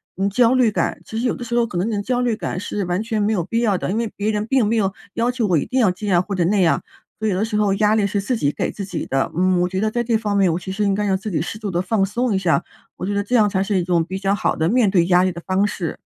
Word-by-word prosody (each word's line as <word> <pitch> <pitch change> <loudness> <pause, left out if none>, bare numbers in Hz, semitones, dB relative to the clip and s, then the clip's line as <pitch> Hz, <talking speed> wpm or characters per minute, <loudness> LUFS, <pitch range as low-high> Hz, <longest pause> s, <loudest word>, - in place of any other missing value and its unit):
嗯， 195 +2 0
焦 235 +4 +3
虑 250 -4 +3
感。 - - -1
其 220 - -6
实 235 - -1
有 - - -1
的 245 - -7
时 240 0 -3
候， 240 - +3
可 175 - -5
能 185 +6 0
你 205 -2 -1
焦 245 +3 -1
虑 240 -3 +1
感 185 - -4
是 205 +1 -3
完 180 +2 -1
全 225 -1 -2
没 205 +2 +1
有 180 -5 0
必 230 +6 -1
要 215 -5 +2
的， - - -3
因 210 - -1
为 230 -2 -2
别 210 +2 -1
人 210 0 -1
并 260 -2 +2
没 220 +3 +1
有 195 -4 +1 0.2
要 235 +1 0
求 245 -3 -1
我 180 -4 +3
一 - - -1
定 260 - -1
要 225 -6 +4
这 205 +4 -6
样 175 -3 +3
或 200 - -5
者 180 - +1
那 200 +3 +2
样， 170 -3 +3 0.4
所 220 - -1
以 210 - +1
有 185 - 0
的 210 - +1
时 220 -1 -2
候 205 -2 +2
压 210 +1 +3
力 215 -2 +2
是 200 0 -1
自 230 +4 -1
己 145 -6 +1
给 - - -2
自 200 - -6
己 185 -3 -4
的。 135 0 -1
嗯， 185 +1 +2
我 180 - +2
觉 190 - -2
得 220 - +1
在 240 +1 -1
这 235 -1 0
方 210 -2 -2
面， 190 -3 +3
我 - - -1
其 190 - -7
实 200 +2 -1
应 200 -1 +2
该 210 +1 -1
让 190 -2 +1
自 195 +3 -6
己 155 - 0
适 175 - -5
度 210 -2 -4
地 175 0 0
放 195 +1 +1
松 235 +4 -1
一 195 - +2
下， 175 -2 +1 0.3
我 - - -4
觉 205 - -2
得 200 0 0
这 245 +5 -1
样 210 -3 +4
才 190 -1 0
是 200 0 0
一 - - -1
种 170 -1 +1
比 190 +3 -5
较 195 0 +1
好 - - 0
的 160 +1 0
面 235 -1 +3
对 175 -3 +3
压 180 0 +4
力 185 - +1
的 170 - -8
方 190 +2 +2
式。 175 -5 -4
205 Hz, 375 characters per minute, -21 LUFS, 185-220 Hz, 0.4 s, 要